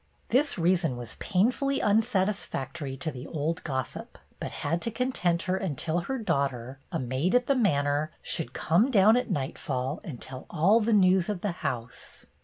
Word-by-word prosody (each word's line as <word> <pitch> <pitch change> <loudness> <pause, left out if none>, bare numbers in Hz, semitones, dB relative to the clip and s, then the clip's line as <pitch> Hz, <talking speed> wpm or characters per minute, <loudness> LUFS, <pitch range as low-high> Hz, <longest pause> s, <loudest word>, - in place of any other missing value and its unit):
This 285 +5 +2
reason 170 -6 +2
was 120 -2 -7
painfully 250 +8 +1
unsatisfactory 190 - 0
to 155 +3 -2
the 130 0 -8
old 160 +1 -2
gossip, 130 -4 -4 0.2
but - - -4
had 165 +4 -2
to - - -1
content 220 -8 0
her 185 +1 0
until 170 -2 -1
her 265 +10 -3
daughter, 135 - -1
a - - -1
maid 130 - 0
at 250 0 +4
the 275 - +3
manor, 150 - +1
should 165 - -1
come 205 +11 +2
down 215 -2 +6
at 250 0 0
nightfall 135 0 -2
and 150 - -7
tell 130 0 -9
all 185 +8 +4
the 230 +1 0
news 190 -2 +4
of 200 -4 -2
the 205 - -1
house. 125 -6 -5
170 Hz, 170 wpm, -28 LUFS, 140-210 Hz, 0.2 s, down